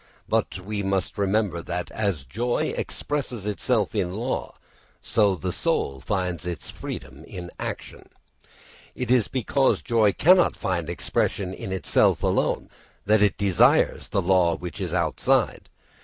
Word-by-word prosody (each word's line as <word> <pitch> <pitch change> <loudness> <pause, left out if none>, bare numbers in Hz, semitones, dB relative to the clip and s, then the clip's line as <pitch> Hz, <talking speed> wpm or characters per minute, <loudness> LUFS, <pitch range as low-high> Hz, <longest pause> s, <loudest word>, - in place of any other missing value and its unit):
But - - 0
we 100 +2 -4
must 95 0 -1
remember 100 -3 +1
that 90 +1 -4
as 100 -11 -2
joy 120 - -1
expresses 130 -8 -3
itself 105 0 0
in 90 0 -1
law, 120 +5 -3 0.5
so 105 -4 +3
the 85 - -3
soul 70 -1 -1
finds 90 -1 -2
its 85 -4 -5
freedom 65 +3 -8
in 90 -2 -8
action. - - -6 0.9
It 125 -1 -2
is 125 -4 +4
because 135 +1 +1
joy 115 -4 +3
cannot 180 +2 +5
find 85 -4 -2
expression 90 +2 -1
in 95 - -6
itself 95 -1 +2
alone - - +1 0.4
that 105 +1 +4
it 105 -1 +3
desires 100 -4 +3
the 100 - 0
law 90 -2 +3
which 90 -1 -7
is - - -3
outside. - - +1
100 Hz, 140 wpm, -25 LUFS, 90-110 Hz, 0.9 s, cannot